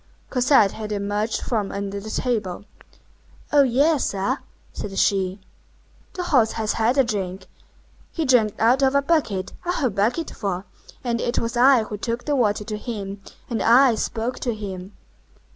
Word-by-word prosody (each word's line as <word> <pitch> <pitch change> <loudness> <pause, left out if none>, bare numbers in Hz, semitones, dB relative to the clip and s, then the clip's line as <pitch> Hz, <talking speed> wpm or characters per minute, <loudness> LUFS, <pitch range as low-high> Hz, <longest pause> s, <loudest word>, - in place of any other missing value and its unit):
Cosette 250 -5 +4
had 215 -1 -6
emerged 205 +2 -1
from 215 -5 -1
under 200 0 -4
the 215 +2 -8
table. 210 -6 -2 0.9
"Oh, 290 - +7
yes, 280 +3 +3
sir!" 200 +8 -1 0.3
said 195 -2 -6
she, 190 -1 +1 0.7
"the 365 - -3
horse 250 -10 +3
has 220 -1 -1
had 230 +4 +1
a 270 - +6
drink; 190 -5 -3 0.7
he 325 - -2
drank 235 -6 +3
out 245 +4 +4
of 270 0 +3
a 280 - +3
bucket, 245 - 0
a 355 - -1
whole 260 -9 0
bucketful, 200 - -1 0.4
and 235 -2 -1
it 240 - -1
was 230 +1 -1
I 250 -1 +5
who 215 -1 -6
took 235 +3 -3
the 295 - +1
water 210 -5 +1
to 210 0 -5
him, 200 -4 -6 0.3
and 230 -3 -2
I 245 +2 +6
spoke 225 +2 -3
to 240 -3 -2
him." 195 -2 -7
225 Hz, 160 wpm, -23 LUFS, 200-255 Hz, 0.9 s, Oh